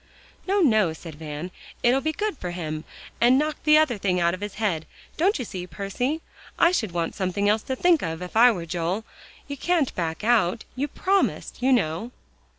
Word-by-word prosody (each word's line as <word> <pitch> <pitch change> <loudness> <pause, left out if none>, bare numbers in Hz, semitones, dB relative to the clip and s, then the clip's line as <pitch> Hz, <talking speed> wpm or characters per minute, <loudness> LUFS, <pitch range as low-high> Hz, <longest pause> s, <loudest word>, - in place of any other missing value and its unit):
"No, 395 +1 +2
no," 215 - +3
said 160 0 -10
Van; 150 +3 -6 0.3
"it'll 250 +3 +4
be 315 - 0
good 420 +4 -2
for 180 -9 -5
him, 155 -3 -5 0.4
and 245 +2 +6
knock 305 +2 0
the 305 0 +7
other 265 -9 +2
thing 185 -2 +1
out 170 0 +2
of 185 - -6
his 205 -1 -5
head, 180 -8 -1 0.3
don't 380 +6 +2
you 250 - -4
see, 180 -3 -6
Percy? 245 - -3 0.4
I 335 - +5
should 225 - -1
want 170 -1 -2
something 200 +1 -1
else 210 +1 +3
to 260 - -3
think 340 +3 +3
of 160 -1 -3
if 180 - -9
I 240 +2 +7
were 175 -6 -4
Joel. 175 +6 -2 0.4
You 285 - -5
can't 330 -2 +1
back 165 +1 -3
out; 220 -3 +2
you 275 +3 -1
promised, 385 +1 0
you 260 +2 +3
know." 200 -2 +1
215 Hz, 200 wpm, -25 LUFS, 175-275 Hz, 0.4 s, the